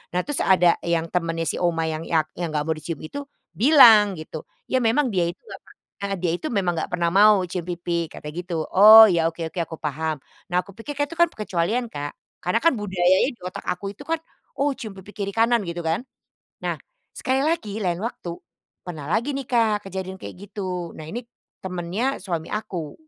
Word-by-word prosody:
Nah, - - +3
terus 290 -1 -2
ada 180 -2 +5
yang 165 -1 +1
temennya 165 -2 -1
si - - 0
oma 170 -2 +1
yang 160 0 -3
yang 160 -2 +2
enggak 155 -4 -2
mau 160 - +1
dicium 155 0 -6
itu 285 - -6 0.3
bilang, 230 -6 +7
gitu, 155 0 -7 0.3
"Ya 260 - +3
memang 245 +5 +3
dia 185 -3 +1
itu 170 - -6
enggak 465 - -10
pernah - - -20 0.3
heeh, 200 0 -1
dia 175 -1 0
itu 245 - -5
memang 190 -5 +1
nggak - - -4
pernah 170 -1 0
mau 205 +2 +6
mau - - -4
cium 175 0 -4
pipi," 170 -1 -3
katanya, 150 +1 -9
gitu, 175 -1 -5 0.2
"Oh 215 +3 +11
ya, 165 -4 +2
oke 165 - -24
oke, 175 - -6
aku 165 - -8
paham." 155 0 -2 0.3
Nah 180 - +3
aku 195 +1 -7
pikir 285 +7 -7
itu 290 +3 -1
kan, 340 0 +3
perkecualian 215 +4 -1
Kak, 145 -8 -5 0.3
karena 180 +7 +1
kan 335 +2 +3
budaya 185 -4 +2 0.2
di 240 - -17
otak 180 0 -7
aku 195 +3 -5
itu - - -11
kan, 330 0 -1 0.4
"Oh, 280 0 +1
cium 220 -5 -7
pipi 205 +2 -14
kiri-kanan," 225 +3 +1
gitu 170 -1 -5
kan. 165 +6 -1 0.6
Nah, - - -2 0.4
sekali 260 +1 0
lagi 230 -9 -1
lain 180 -2 -1
waktu, 175 -7 -5 0.5
pernah 155 -5 -7
lagi 235 - 0
nih 275 -2 -5
Kak, 215 -5 +1
kejadian 190 0 -6
kayak - - -8
gitu, 185 -4 -5
nah 155 - -9
ini 240 +8 -5 0.4
temennya 190 +9 -2
suami 170 -4 -3
aku. 180 -7 -4
185 Hz, 200 wpm, -23 LUFS, 170-225 Hz, 0.6 s, Oh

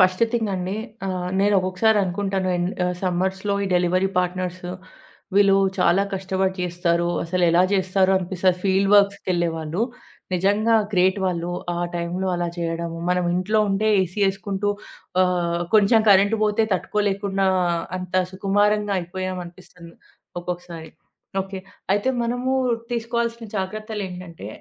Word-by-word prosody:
First 185 +3 +4
thing 225 -3 0
అండి. 185 +2 -3 0.3
ఆహ్, 180 -1 -3
నేనొక్కొక్కసారి 200 +2 +3
అనుకుంటాను 190 0 -1
ఎన్ 175 0 0 0.2
ఆహ్, 180 0 -1
సమ్మర్స్‌లో 190 +2 -1
ఈ - - -2
డెలివరీ 180 +2 +2
పార్ట్నర్స్ 180 0 -2 0.7
వీళ్ళు 200 -1 +5 0.2
చాలా 180 +2 +4
కష్టపడి 190 0 -1
చేస్తారు. 175 -1 0 0.2
అసలెలా 175 0 +3
చేస్తారో 190 0 +2
అనిపిస్తుంది. 180 0 0
ఫీల్డ్ 195 +1 +2
వర్క్స్‌కి 200 -1 +3
వెళ్లేవాళ్ళు. 170 +1 -1 0.5
నిజంగా 205 +5 +2 0.2
గ్రేట్ 185 +2 +3
వాళ్ళు. 175 -1 -2 0.3
ఆ - - -2 0.2
టైంలో 175 +2 -2
అలా 175 0 -1
చేయడము, 165 0 -3
మనం 180 0 +1
ఇంట్లో 205 +4 +1
ఉంటే 195 +2 0
ఏసీ 185 +2 -3
వేసుకుంటూ, 195 +1 -2 0.5
ఆహ్, 175 -2 0
కొంచెం 215 +2 +5
కరెంట్ 200 +3 +5
పోతే 215 +1 +2
తట్టుకోలేకుండా 195 0 0 0.5
అంత 185 0 -8 0.2
సుకుమారంగా 205 +1 +1
అయిపోయాం 185 +1 -4
అనిపిస్తుంది 170 -1 -14 0.5
ఒక్కొక్కసారి. 175 -2 -6 0.5
ఓకే, 190 0 -7 0.3
అయితే 205 +6 +1
మనము 245 +2 -1 0.4
తీసుకోవాల్సిన 235 0 -2
జాగ్రత్తలు 215 +2 -4
ఏంటంటే, 180 - -9
185 Hz, 120 wpm, -23 LUFS, 180-200 Hz, 0.7 s, వీళ్ళు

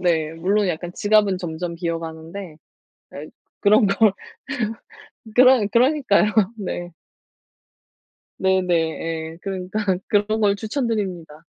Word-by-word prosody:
네. 160 -3 +1
물론 195 +4 +1
약간 175 +1 -4
지갑은 205 -3 +2
점점 170 0 -5
비어 170 -1 -2
가는데 165 +1 -8 0.6
아이 150 +2 -8 0.3
그런 210 +1 +5
걸 200 0 +3 1.2
그러 255 -3 +6
그러니까요. 245 -5 +3 0.3
네. 175 -3 -5 1.5
네네. 190 -1 +1
예. 160 0 -2
그러니까 190 +1 -4 0.3
그런 215 +1 +1
걸 200 -1 +3
추천 235 +5 -2
드립니다. 175 -8 -4
190 Hz, 230 characters per minute, -22 LUFS, 165-210 Hz, 1.5 s, 그러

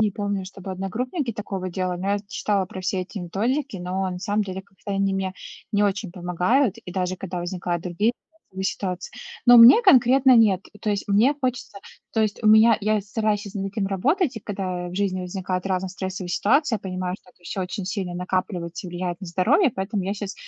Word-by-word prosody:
не 215 -1 +3
помню, 200 -1 -3
чтобы 190 0 -9
одногруппники 235 - -3
такого 195 -3 -4
делали, 180 0 -2
но 195 - -2
я 205 - +1
читала 200 -3 0
про 190 - -8
все 185 +1 -1
эти 200 +3 -8
методики, 220 - -2
но, 185 +2 -2
на 180 - -5
самом 205 +3 0
деле, 190 -1 -5
как-то 200 +1 -9
они 195 0 +1
мне 190 -1 -2 0.4
не 205 0 +3
очень 200 -2 -1
помогают, 180 +7 +1
и 180 - -10
даже 185 0 -1
когда 185 -1 -5
возникают 175 -1 -3
другие 195 +6 0 0.4
стрессовые 190 0 -5
ситуации. 185 -1 -3 0.4
Но 245 0 +9
мне 240 - +9
конкретно- 260 - +6
нет. 205 -5 +4 0.2
То 215 - -3
есть 205 0 -2
мне 220 +9 +4
хочется 250 -6 -3 0.3
то 225 - +1
есть 215 -1 -1
у - - +1
меня 220 +1 +7
я 215 +1 +1
стараюсь 210 +1 -1
щас 200 -1 -9
над 195 -1 -2
этим 205 -2 -1
работать, 275 - +1
и - - -5
когда 185 -3 -4
в 175 - -8
жизни 190 -2 0
возникают 185 0 -3
разные 190 -1 -1
стрессовые 190 0 -5
ситуации, 240 - +2
я - - -9
понимаю, 185 -1 -4
что 180 - -21
это 180 - -31
всё 190 +2 -4
очень 185 +1 -4
сильно 185 -2 -3
накапливается 180 -1 -3
и - - -7
влияет 175 0 -4
на 190 - -7
здоровье, 240 - +3
поэтому 195 +1 -2
я 195 +2 -1
щас, 200 -1 -5
195 Hz, 210 wpm, -24 LUFS, 185-215 Hz, 0.4 s, Но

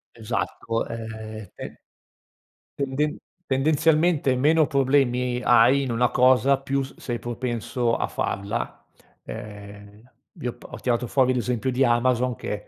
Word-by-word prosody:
Esatto, 115 0 -3
ehm 110 -2 -7
te - - -8 1.0
tenden-tendenzialmente 150 +1 +1
meno 155 +4 +4
problemi 125 -3 +1
hai 120 +4 +5
in 130 -3 -2
una 120 +1 +2
cosa 130 +2 +4
più 135 0 -1
s-sei 125 -2 -5
propenso 120 0 -2
a - - -1
farla, 100 +1 -3 0.4
ehm 105 - -10 0.3
vi - - -3
ho 120 - -3
p 120 - -20
ho - - -9
tirato 125 -1 0
fuori 130 +1 +2
l'esempio 125 +1 -1
di 130 +2 +2
Amazon 125 0 +2
che - - -5
125 Hz, 125 wpm, -24 LUFS, 115-135 Hz, 1.0 s, hai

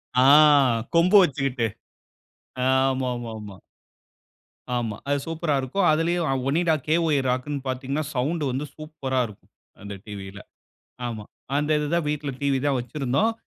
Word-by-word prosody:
ஆ, 125 - +5 0.7
கொம்பு 170 +4 +4
வச்சுகிட்டு 135 -6 0 1.0
ஆமா, 130 -1 +2
ஆமா, 120 -1 -6
ஆமா. 105 -2 -10 1.2
ஆமா. 115 -3 -2
அது 145 - +2
சூப்பரா 165 -2 -1
இருக்கும். 160 +9 0
அதுலயும் 165 +2 +1 0.2
ONIDA 165 +4 +2
KY 160 -1 +2
ராக்குனு 130 +3 -1
பாத்தீங்கன்னா, 135 +3 -2
சவுண்டு 145 +5 -1
வந்து 135 +4 -3
சூப்பரா 150 -4 -3
இருக்கும், 105 -2 -17 0.3
அந்த 100 0 -7
டிவியில. 100 -2 -8 0.7
ஆமா. 110 -3 -5 0.3
அந்த 150 +1 0
இதுதான் 150 +2 -1
வீட்ல 150 -1 -2
TV 140 -1 +1
தான் 140 -2 +2
வைச்சுருந்தோம். 135 - 0
140 Hz, 125 wpm, -24 LUFS, 125-155 Hz, 1.2 s, ஆ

